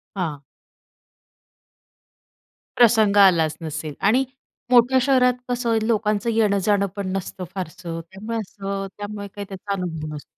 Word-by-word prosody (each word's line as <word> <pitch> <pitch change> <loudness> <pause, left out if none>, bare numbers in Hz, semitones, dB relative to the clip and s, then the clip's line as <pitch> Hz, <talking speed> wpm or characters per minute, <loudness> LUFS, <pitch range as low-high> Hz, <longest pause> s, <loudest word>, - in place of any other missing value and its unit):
हां. 165 -7 -3 2.4
प्रसंग 220 -4 +5
आलाच 170 -6 +5
नसेल 155 -1 -5
आणि 250 +6 +4 0.5
मोठ्या 250 +1 +6
शहरात 255 -1 +4 0.2
कसं 245 -1 -1
आहे, 225 -1 +3
लोकांचं 215 0 +1
येणं-जाणं 205 -2 +2
पण 200 -2 -3
नसतं 190 0 -4
फारसं 170 -2 -5
त्यामुळे 215 +4 -5
असं, 195 -1 -4
त्यामुळे 205 0 -6
काही 205 -1 -6
त्याचा 195 +1 -7
अनुभव 165 -5 -4
नसतो. 145 - -8
200 Hz, 120 wpm, -23 LUFS, 185-225 Hz, 2.4 s, मोठ्या